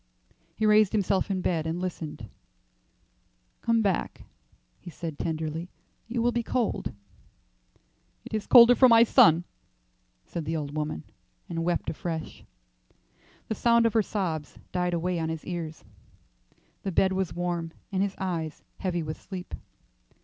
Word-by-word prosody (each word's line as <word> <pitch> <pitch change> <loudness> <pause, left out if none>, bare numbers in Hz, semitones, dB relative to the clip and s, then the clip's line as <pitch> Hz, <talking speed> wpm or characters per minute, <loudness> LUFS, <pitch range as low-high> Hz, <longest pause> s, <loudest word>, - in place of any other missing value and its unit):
He 220 - 0
raised 215 -2 +5
himself 200 -2 +1
in 190 -2 -1
bed 165 -3 0
and 165 +2 -2
listened. 175 -4 -5 1.3
"Come 230 -1 +2
back," 195 -4 -1 0.6
he 180 - -10
said, 160 -2 -7
tenderly. 160 +1 -3 0.4
"You 235 0 -1
will 240 - +3
be 235 - 0
cold." 235 0 -1 1.3
"It - - -10
is 215 -2 -2
colder 240 -1 +9
for 255 +1 +6
my 230 0 +8
son," 170 -6 +6 0.8
said 170 - -5
the 160 +1 -1
old 145 -1 -5
woman, 150 - -3 0.4
and 165 -1 -3
wept 175 +1 -1
afresh. 160 -1 -5 1.0
The - - -1
sound 235 +1 +3
of 230 - +2
her 225 - +4
sobs 175 -8 -3
died 180 -1 0
away 175 +1 -1
on 160 0 -1
his 160 -1 -5
ears. 165 -3 -5 1.0
The 195 - -3
bed 190 +2 +3
was 190 -4 -2
warm, 175 -2 -2 0.2
and 190 -1 0
his 195 -1 -1
eyes 165 -5 -3 0.2
heavy 175 -3 -1
with 155 0 -6
sleep. 185 -2 -8
180 Hz, 145 wpm, -27 LUFS, 160-210 Hz, 1.3 s, colder